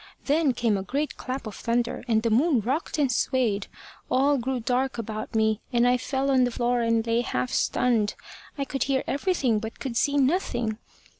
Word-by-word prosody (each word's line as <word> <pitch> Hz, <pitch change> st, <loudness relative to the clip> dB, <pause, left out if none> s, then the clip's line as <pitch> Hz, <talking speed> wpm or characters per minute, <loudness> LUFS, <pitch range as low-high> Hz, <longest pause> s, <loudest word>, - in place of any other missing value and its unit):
Then 290 Hz, -1 st, +2 dB
came 230 Hz, -4 st, +1 dB
a -, -, -3 dB
great 280 Hz, +10 st, -2 dB
clap 260 Hz, 0 st, -5 dB
of 215 Hz, -, -6 dB
thunder, 235 Hz, +2 st, -1 dB
and 220 Hz, -2 st, +2 dB
the 230 Hz, -, +1 dB
moon 270 Hz, +4 st, +3 dB
rocked 270 Hz, -, -2 dB
and 280 Hz, -4 st, +2 dB
swayed. 235 Hz, -5 st, 0 dB, 0.4 s
All 275 Hz, +2 st, +3 dB
grew 255 Hz, +1 st, -2 dB
dark 255 Hz, +3 st, 0 dB
about 220 Hz, -1 st, -5 dB
me, 220 Hz, 0 st, +2 dB
and 240 Hz, -1 st, +3 dB
I 250 Hz, 0 st, +4 dB
fell 270 Hz, +2 st, -1 dB
on 260 Hz, -1 st, +4 dB
the 245 Hz, -, +2 dB
floor 240 Hz, 0 st, 0 dB
and 230 Hz, -1 st, +1 dB
lay 230 Hz, 0 st, +2 dB
half 125 Hz, -, -2 dB
stunned. 225 Hz, -4 st, +1 dB, 0.4 s
I 280 Hz, -, -1 dB
could 270 Hz, -1 st, -2 dB
hear 270 Hz, -1 st, 0 dB
everything 275 Hz, -, +1 dB
but 220 Hz, +1 st, -7 dB
could 260 Hz, -4 st, -4 dB
see 285 Hz, +4 st, +2 dB
nothing. 245 Hz, -, 0 dB
245 Hz, 195 wpm, -26 LUFS, 225-270 Hz, 0.4 s, I